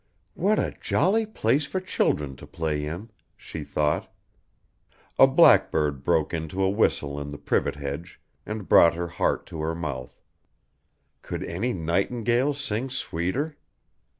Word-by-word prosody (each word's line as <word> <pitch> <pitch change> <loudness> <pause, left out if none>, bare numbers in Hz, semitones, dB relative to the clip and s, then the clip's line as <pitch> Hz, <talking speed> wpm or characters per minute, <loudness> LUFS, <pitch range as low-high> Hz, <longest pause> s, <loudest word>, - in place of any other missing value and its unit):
"What 205 +5 +1
a - - 0
jolly 215 +4 +2
place 140 - +1
for 190 - -2
children 75 - 0
to - - -12
play 75 -2 -2
in," 90 +9 -6 0.3
she 80 - -7
thought. 75 +1 -1 1.1
A - - +9
blackbird 75 -3 +4
broke 80 -1 +1
into 80 +4 -2
a 95 - +3
whistle 75 -9 0
in 70 - -6
the 70 - -7
privet - - 0
hedge 70 +4 -6 0.2
and 105 0 -6
brought 85 0 +6
her 85 0 -3
heart 85 - 0
to 80 - -7
her 80 +1 -1
mouth. 70 -7 -5 1.0
Could - - -5
any 110 +9 -2
nightingale 120 - 0
sing 130 -2 -3
sweeter? 130 - -2
85 Hz, 140 wpm, -26 LUFS, 75-120 Hz, 1.1 s, A